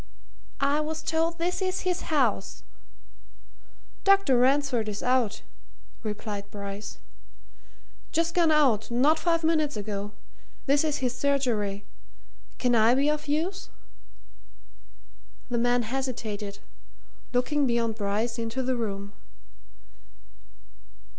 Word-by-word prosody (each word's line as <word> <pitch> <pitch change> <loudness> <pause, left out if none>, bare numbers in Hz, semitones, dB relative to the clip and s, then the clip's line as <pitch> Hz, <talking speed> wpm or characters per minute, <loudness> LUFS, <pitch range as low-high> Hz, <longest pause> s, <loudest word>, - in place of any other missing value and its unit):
"I 280 +2 +2
was 315 +1 -3
told 325 +1 0
this 355 +3 -1
is 370 0 -1
his 365 -1 -2
house." 255 -11 0 1.4
"Dr. 395 -8 +5
Ransford 260 -4 +2
is 205 0 -5
out," 250 -4 +1 0.6
replied 210 -2 -5
Bryce. 200 0 -7 1.1
"Just 335 +1 +1
gone 340 -2 +4
out 270 -9 +3
not 280 +7 +3
five 330 0 +1
minutes 310 -5 +1
ago. 205 0 -4 0.5
This 285 +2 +3
is 300 -4 -1
his 245 -1 -1
surgery. 235 -9 0 0.7
Can 245 -1 +1
I 230 +1 +5
be 280 +2 +3
of 300 0 -3
use?" 330 +7 -1 1.8
The 240 - +1
man 245 +1 +2
hesitated, 220 -5 -4 0.7
looking 270 +3 +1
beyond 235 -2 +1
Bryce 215 +3 -1
into 230 +3 -2
the 255 0 0
room. 200 -3 -4
255 Hz, 110 wpm, -27 LUFS, 220-305 Hz, 1.8 s, Dr